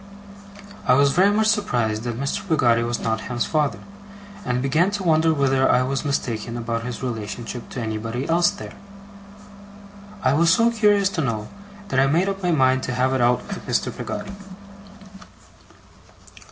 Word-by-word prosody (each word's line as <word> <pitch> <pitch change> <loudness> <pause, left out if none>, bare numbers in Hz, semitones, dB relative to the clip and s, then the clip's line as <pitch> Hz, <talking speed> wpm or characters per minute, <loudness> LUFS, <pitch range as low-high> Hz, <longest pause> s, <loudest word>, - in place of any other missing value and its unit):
I - - +6
was 140 +1 +4
very 190 +6 +4
much 215 +1 +2
surprised 120 - 0
that 120 -1 -4
Mr. 140 +7 -3
Peggotty 120 -7 +3
was 120 0 -2
not 110 0 -1
Ham's 120 0 -2
father, 150 -3 0 0.7
and 125 0 -1
began 155 +8 +2
to 205 -1 -4
wonder 160 -1 +3
whether 135 -3 +2
I 125 - +4
was 135 +1 -2
mistaken 120 -5 -3
about 115 0 -3
his 125 +1 -6
relationship 115 0 -5
to 125 - -5
anybody 115 +3 -4
else 170 +3 +3
there. 200 0 -9 1.5
I 130 - +3
was 165 +3 +3
so 230 +6 +4
curious 205 -3 +3
to 180 -4 -2
know, 110 -6 -3 0.4
that 135 - +1
I 135 - +4
made 170 +7 +2
up 195 0 -4
my 180 - 0
mind 130 -5 +3
to 130 - -2
have 130 +1 +1
it 130 - 0
out 120 +1 +2
with - - -6
Mr. - - -1
Peggotty. - - -6
130 Hz, 165 wpm, -22 LUFS, 120-170 Hz, 1.5 s, I